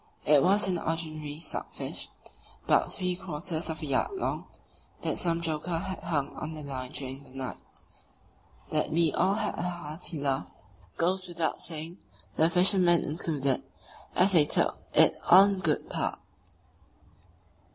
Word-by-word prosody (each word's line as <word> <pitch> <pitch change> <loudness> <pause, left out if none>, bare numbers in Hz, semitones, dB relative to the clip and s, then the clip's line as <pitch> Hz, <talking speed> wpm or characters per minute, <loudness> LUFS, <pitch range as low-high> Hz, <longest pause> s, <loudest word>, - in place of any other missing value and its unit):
It 150 -2 +6
was 200 +4 +3
an 180 -2 0
ordinary 155 -2 -3
stockfish, - - -5 0.6
about - - +3
three 180 -1 -2
quarters 170 -2 -4
of 160 0 -5
a - - -2
yard 140 -2 +1
long, - - -2 0.6
that - - 0
some 170 -1 0
joker 165 +1 -2
had 190 +3 -4
hung 145 -5 -2
on 155 +1 -5
the 155 - -7
line 130 -2 -5
during 135 0 -6
the - - -18
night. 130 0 -6 1.1
That - - +1
we 165 -1 +2
all 195 +2 +2
had 215 -1 -2
a - - 0
hearty 170 -2 -5
laugh 135 -1 -1 0.5
goes 185 +2 0
without 170 -2 -1
saying, 165 +2 -4 0.4
the 160 +1 +4
fishermen 180 -1 +5
included, 145 -4 -1 0.5
as 190 +2 +5
they 160 -5 +7
took - - +1 0.2
it - - +7
all 185 +3 +10
in 200 -1 0
good 160 -5 0
part. - - -2
165 Hz, 150 wpm, -29 LUFS, 150-180 Hz, 1.1 s, all